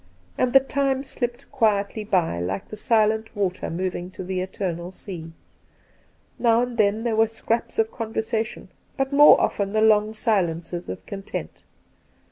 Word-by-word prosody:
And 255 Hz, -, +1 dB
the 270 Hz, -, +8 dB
time 270 Hz, 0 st, 0 dB
slipped 245 Hz, -1 st, -4 dB
quietly 215 Hz, -5 st, +1 dB
by, 180 Hz, -, +1 dB
like 95 Hz, +3 st, -3 dB
the -, -, -6 dB
silent 220 Hz, 0 st, +1 dB
water 190 Hz, -3 st, -1 dB
moving 180 Hz, +1 st, -3 dB
to -, -, -4 dB
the 185 Hz, 0 st, -2 dB
eternal 185 Hz, -2 st, -4 dB
sea. 175 Hz, -4 st, -8 dB, 1.1 s
Now 235 Hz, 0 st, +4 dB
and 245 Hz, -1 st, -4 dB
then 215 Hz, 0 st, +2 dB
there 235 Hz, -2 st, 0 dB
were 225 Hz, 0 st, +4 dB
scraps 225 Hz, +1 st, -2 dB
of 225 Hz, 0 st, +1 dB
conversation, 220 Hz, 0 st, -3 dB, 0.3 s
but 270 Hz, 0 st, -1 dB
more 290 Hz, +1 st, +8 dB
often 200 Hz, 0 st, 0 dB
the 215 Hz, -, +2 dB
long 215 Hz, 0 st, +4 dB
silences 175 Hz, -6 st, -1 dB
of -, -, -7 dB
content. 195 Hz, -1 st, -6 dB
215 Hz, 150 wpm, -24 LUFS, 185-230 Hz, 1.1 s, the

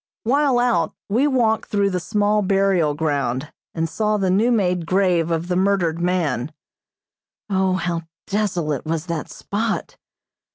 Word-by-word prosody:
While 275 Hz, +2 st, +2 dB
out, 235 Hz, -10 st, +1 dB
we 245 Hz, +8 st, +3 dB
walked 235 Hz, -5 st, +1 dB
through 200 Hz, -1 st, +1 dB
the 180 Hz, -, -1 dB
small 210 Hz, +2 st, +1 dB
burial 195 Hz, -6 st, +2 dB
ground, 145 Hz, -3 st, -1 dB, 0.2 s
and 165 Hz, -1 st, 0 dB
saw 215 Hz, +5 st, 0 dB
the 190 Hz, -2 st, +1 dB
new 220 Hz, +6 st, +3 dB
made 180 Hz, -7 st, +1 dB
grave 180 Hz, -3 st, +2 dB
of 165 Hz, +1 st, -1 dB
the 180 Hz, -, -1 dB
murdered 185 Hz, -3 st, +1 dB
man. 160 Hz, -7 st, 0 dB, 1.0 s
O, 190 Hz, -1 st, +2 dB
how 175 Hz, -2 st, -1 dB, 0.2 s
desolate 180 Hz, -, -1 dB
was 160 Hz, 0 st, -2 dB
that 170 Hz, -4 st, -4 dB
spot! 220 Hz, +2 st, -3 dB
185 Hz, 140 wpm, -21 LUFS, 165-210 Hz, 1.0 s, we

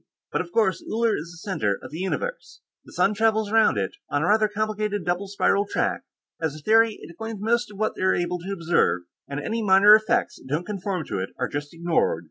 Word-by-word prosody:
But, -, -, 0 dB
of -, -, -8 dB
course, 215 Hz, -, +1 dB
Uller 225 Hz, 0 st, +2 dB
is 165 Hz, +3 st, -6 dB
the 175 Hz, +3 st, -12 dB
center 105 Hz, -, 0 dB
of -, -, -11 dB
the 160 Hz, -, -6 dB
universe; 485 Hz, -, -4 dB, 0.2 s
the -, -, -14 dB
sun 200 Hz, -, +2 dB
travels 220 Hz, 0 st, +1 dB
around 225 Hz, -, +4 dB
it, 95 Hz, -2 st, -2 dB
on 145 Hz, +1 st, 0 dB
a -, -, +1 dB
rather 215 Hz, +1 st, +4 dB
complicated 210 Hz, -2 st, -2 dB
double 180 Hz, +3 st, -1 dB
spiral 200 Hz, 0 st, +1 dB
track. -, -, -1 dB, 0.4 s
As 160 Hz, -2 st, -1 dB
a -, -, -9 dB
theory, 225 Hz, +2 st, +4 dB
it -, -, -10 dB
explains 225 Hz, +4 st, -6 dB
most 235 Hz, +3 st, +1 dB
of 205 Hz, -, -12 dB
what 215 Hz, +1 st, 0 dB
they're 190 Hz, 0 st, +2 dB
able 175 Hz, 0 st, -1 dB
to 185 Hz, +4 st, -6 dB
observe, 170 Hz, -, +1 dB, 0.2 s
and 140 Hz, 0 st, -4 dB
any 225 Hz, +9 st, -2 dB
minor 200 Hz, 0 st, +7 dB
effects 215 Hz, 0 st, +2 dB
that -, -, -15 dB
don't 155 Hz, +5 st, -1 dB
conform 195 Hz, -4 st, -3 dB
to 95 Hz, -, -3 dB
it 95 Hz, -, -3 dB
are -, -, -1 dB
just 145 Hz, 0 st, -5 dB
ignored. 170 Hz, -, 0 dB
195 Hz, 225 wpm, -24 LUFS, 170-215 Hz, 0.4 s, minor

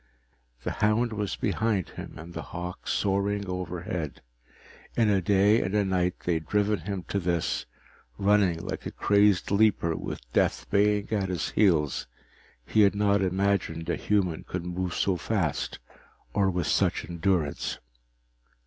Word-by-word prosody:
The -, -, -2 dB
hound 110 Hz, +2 st, +1 dB
was 100 Hz, -8 st, -2 dB
behind 105 Hz, -1 st, 0 dB
him -, -, -9 dB
and 85 Hz, +2 st, -9 dB
the -, -, -4 dB
hawk 90 Hz, +1 st, -7 dB
soaring 100 Hz, +1 st, 0 dB
overhead. 90 Hz, -3 st, -4 dB, 0.7 s
In 110 Hz, -3 st, +4 dB
a 95 Hz, -2 st, +3 dB
day 100 Hz, +4 st, +4 dB
and 95 Hz, +3 st, -2 dB
a 105 Hz, -1 st, +3 dB
night 90 Hz, -1 st, 0 dB
they 90 Hz, -, 0 dB
had 80 Hz, -2 st, -3 dB
driven 105 Hz, 0 st, +1 dB
him 95 Hz, +1 st, -4 dB
to 100 Hz, -, 0 dB
this, 85 Hz, -2 st, -1 dB, 0.5 s
running 100 Hz, -4 st, +3 dB
like -, -, -4 dB
a -, -, -5 dB
crazed 100 Hz, -3 st, +3 dB
leaper 100 Hz, -5 st, +3 dB
with -, -, -5 dB
death -, -, +1 dB
baying 105 Hz, 0 st, +2 dB
at 100 Hz, -3 st, 0 dB
his 90 Hz, -4 st, -2 dB
heels 80 Hz, -9 st, +2 dB, 0.6 s
he 110 Hz, -, +3 dB
had 100 Hz, -1 st, +5 dB
not 100 Hz, -1 st, +3 dB
imagined 95 Hz, -3 st, 0 dB
a -, -, +1 dB
human 95 Hz, -6 st, 0 dB
could 90 Hz, -1 st, -5 dB
move 90 Hz, 0 st, -3 dB
so 95 Hz, -2 st, +1 dB
fast 85 Hz, -4 st, -1 dB, 0.6 s
or 100 Hz, -2 st, +3 dB
with 90 Hz, -3 st, -1 dB
such -, -, +1 dB
endurance. 85 Hz, -3 st, -1 dB
95 Hz, 150 wpm, -27 LUFS, 85-105 Hz, 0.7 s, had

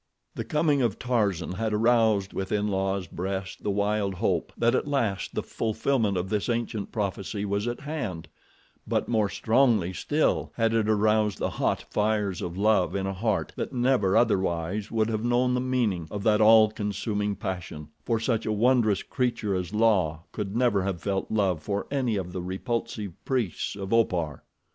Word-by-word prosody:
The -, -, -4 dB
coming 150 Hz, -2 st, +1 dB
of 115 Hz, -4 st, 0 dB
Tarzan 105 Hz, -9 st, 0 dB
had 110 Hz, +4 st, -2 dB
aroused 110 Hz, -3 st, +3 dB
within 105 Hz, +2 st, -1 dB
La's 95 Hz, -1 st, -1 dB
breast 95 Hz, +1 st, -5 dB
the -, -, -2 dB
wild 100 Hz, -1 st, 0 dB
hope -, -, 0 dB
that 120 Hz, 0 st, +3 dB
at -, -, 0 dB
last 115 Hz, -9 st, -1 dB
the -, -, -1 dB
fulfillment 110 Hz, -2 st, 0 dB
of 90 Hz, +1 st, -2 dB
this 105 Hz, +3 st, -1 dB
ancient 115 Hz, -3 st, -2 dB
prophecy 100 Hz, -1 st, -3 dB
was 100 Hz, +2 st, -1 dB
at 120 Hz, -, -3 dB
hand; 125 Hz, -, -4 dB, 0.6 s
but -, -, 0 dB
more 110 Hz, -3 st, +1 dB
strongly 110 Hz, -7 st, +2 dB
still 150 Hz, -, 0 dB
had 115 Hz, -1 st, +1 dB
it 110 Hz, -1 st, +1 dB
aroused 105 Hz, -1 st, +2 dB
the -, -, -2 dB
hot -, -, -1 dB
fires 105 Hz, -3 st, 0 dB
of 85 Hz, +1 st, -5 dB
love 100 Hz, -3 st, +2 dB
in 95 Hz, -1 st, -1 dB
a 95 Hz, -, -2 dB
heart 105 Hz, +1 st, -1 dB
that -, -, -4 dB
never 120 Hz, -6 st, +2 dB
otherwise 95 Hz, -2 st, +1 dB
would 110 Hz, -1 st, +1 dB
have 110 Hz, -1 st, -2 dB
known 120 Hz, +1 st, +2 dB
the 125 Hz, -, +1 dB
meaning 115 Hz, -10 st, 0 dB
of 105 Hz, -1 st, -5 dB
that 105 Hz, 0 st, +3 dB
all 110 Hz, 0 st, +7 dB
consuming 105 Hz, 0 st, -2 dB
passion, 90 Hz, -6 st, -6 dB
for 115 Hz, -2 st, 0 dB
such 115 Hz, -1 st, -1 dB
a -, -, +1 dB
wondrous 110 Hz, -2 st, +3 dB
creature 120 Hz, -5 st, -1 dB
as 90 Hz, -1 st, -2 dB
La 100 Hz, -8 st, +2 dB
could 105 Hz, -1 st, -4 dB
never 120 Hz, -5 st, +2 dB
have 95 Hz, -2 st, -2 dB
felt 95 Hz, +1 st, -2 dB
love 95 Hz, -7 st, +1 dB
for 100 Hz, +5 st, -2 dB
any 130 Hz, -6 st, 0 dB
of 90 Hz, -3 st, -3 dB
the 90 Hz, -, -3 dB
repulsive 105 Hz, +2 st, -3 dB
priests 120 Hz, -11 st, -1 dB
of 100 Hz, +1 st, -4 dB
Opar. 85 Hz, -, +1 dB
105 Hz, 175 wpm, -27 LUFS, 95-115 Hz, 0.6 s, all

